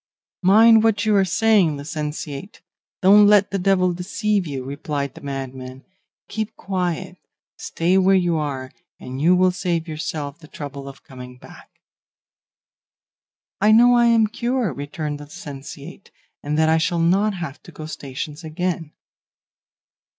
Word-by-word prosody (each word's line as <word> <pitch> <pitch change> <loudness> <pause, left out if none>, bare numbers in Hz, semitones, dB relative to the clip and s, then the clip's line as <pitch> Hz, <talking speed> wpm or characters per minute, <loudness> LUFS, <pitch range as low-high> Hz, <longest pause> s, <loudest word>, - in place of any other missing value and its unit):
"'Mind 220 +4 +6
what 220 -1 +2
you 215 -1 +3
are 195 - +4
saying, 190 -4 +2
licentiate; 150 +4 -6 0.4
don't 205 +2 +7
let 205 -2 +4
the 195 - -1
devil 185 -1 +2
deceive 195 +2 -1
you,' 135 -3 -5
replied 140 0 -4
the - - -13
madman. 135 -1 -7 0.4
'Keep 220 0 -4
quiet, 185 -1 -3 0.4
stay 180 +3 0
where 190 +1 +4
you 175 -3 +2
are, 135 -4 -3 0.3
and 130 +2 -7
you 175 +4 +5
will 185 0 +3
save 175 -2 -2
yourself 155 -1 -5
the 155 - -15
trouble 140 -2 -8
of 135 0 -12
coming 125 -1 -11
back.' - - -16 1.8
"'I 210 +1 +5
know 240 +2 +6
I 240 0 +4
am 230 -1 +4
cured,' 235 - -2
returned 145 +1 -5
the 145 - -9
licentiate, 145 +4 -10 0.3
'and 150 +1 -2
that 160 0 +3
I 160 0 +3
shall 170 +2 0
not 195 +5 +2
have 170 -6 -7
to - - -14
go 155 - -9
stations 145 +1 -7
again. 165 -1 -3
170 Hz, 145 wpm, -21 LUFS, 145-195 Hz, 1.8 s, don't